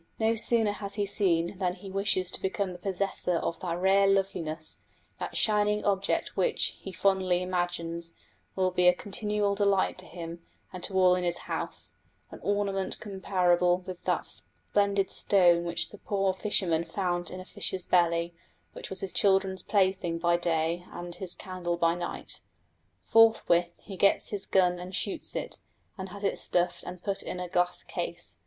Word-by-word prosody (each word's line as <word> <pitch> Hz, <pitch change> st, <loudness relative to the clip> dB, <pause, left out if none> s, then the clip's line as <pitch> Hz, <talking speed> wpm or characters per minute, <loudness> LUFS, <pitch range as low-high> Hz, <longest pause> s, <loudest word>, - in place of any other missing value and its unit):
No 220 Hz, 0 st, +2 dB
sooner 225 Hz, -1 st, +2 dB
has 205 Hz, -1 st, -5 dB
he 205 Hz, -1 st, 0 dB
seen 185 Hz, -2 st, +1 dB
than 180 Hz, -2 st, 0 dB
he 195 Hz, +1 st, -10 dB
wishes 190 Hz, -2 st, +1 dB
to -, -, -2 dB
become 190 Hz, 0 st, -1 dB
the 180 Hz, -, -10 dB
possessor 190 Hz, -1 st, -1 dB
of 165 Hz, 0 st, -2 dB
that 170 Hz, -2 st, -3 dB
rare 195 Hz, +2 st, +4 dB
loveliness, 175 Hz, -5 st, -1 dB, 0.4 s
that -, -, -3 dB
shining 210 Hz, -1 st, +3 dB
object 195 Hz, -1 st, 0 dB
which, 475 Hz, -, +1 dB
he 190 Hz, -, -7 dB
fondly 185 Hz, -2 st, +1 dB
imagines, 170 Hz, -2 st, -3 dB, 0.4 s
will 185 Hz, -1 st, +1 dB
be 180 Hz, 0 st, +3 dB
a 180 Hz, -, +6 dB
continual 205 Hz, +1 st, -1 dB
delight 200 Hz, -2 st, +1 dB
to 185 Hz, -, -6 dB
him 170 Hz, -1 st, -8 dB, 0.3 s
and 185 Hz, -, -7 dB
to 190 Hz, -, -4 dB
all 185 Hz, -1 st, +6 dB
in 180 Hz, 0 st, 0 dB
his 175 Hz, -1 st, 0 dB
house, -, -, -5 dB, 0.4 s
an -, -, -9 dB
ornament 200 Hz, -1 st, -1 dB
comparable 180 Hz, -3 st, +2 dB
to 185 Hz, 0 st, -6 dB
that -, -, 0 dB
splendid 200 Hz, -1 st, -1 dB
stone 175 Hz, -3 st, +4 dB
which 170 Hz, 0 st, -2 dB
the 205 Hz, -, -12 dB
poor 195 Hz, -2 st, 0 dB
fisherman 185 Hz, -4 st, 0 dB
found 175 Hz, 0 st, -2 dB
in 185 Hz, -, -7 dB
a 185 Hz, -, -9 dB
fish's 185 Hz, -1 st, -3 dB
belly, 170 Hz, -1 st, +2 dB, 0.4 s
which -, -, -8 dB
was 190 Hz, -, 0 dB
his 195 Hz, -, -3 dB
children's 190 Hz, -1 st, +2 dB
plaything 190 Hz, -4 st, +1 dB
by 170 Hz, 0 st, +2 dB
day 170 Hz, 0 st, 0 dB
and 175 Hz, 0 st, -7 dB
his 185 Hz, -3 st, -3 dB
candle 180 Hz, -2 st, -4 dB
by 165 Hz, -1 st, +3 dB
night. 175 Hz, 0 st, -6 dB, 0.6 s
Forthwith 220 Hz, -7 st, +4 dB
he 195 Hz, -3 st, -10 dB
gets 200 Hz, -, +3 dB
his 205 Hz, -2 st, -3 dB
gun 180 Hz, -2 st, +3 dB
and 180 Hz, +1 st, -6 dB
shoots 200 Hz, -, -2 dB
it, -, -, -4 dB, 0.4 s
and 190 Hz, -1 st, -6 dB
has 200 Hz, +2 st, -9 dB
it 195 Hz, -, 0 dB
stuffed 175 Hz, 0 st, 0 dB
and 180 Hz, 0 st, -8 dB
put 200 Hz, -1 st, -2 dB
in 180 Hz, -, -5 dB
a 180 Hz, -, -3 dB
glass 180 Hz, 0 st, 0 dB
case. -, -, -5 dB
185 Hz, 175 wpm, -29 LUFS, 175-200 Hz, 0.6 s, a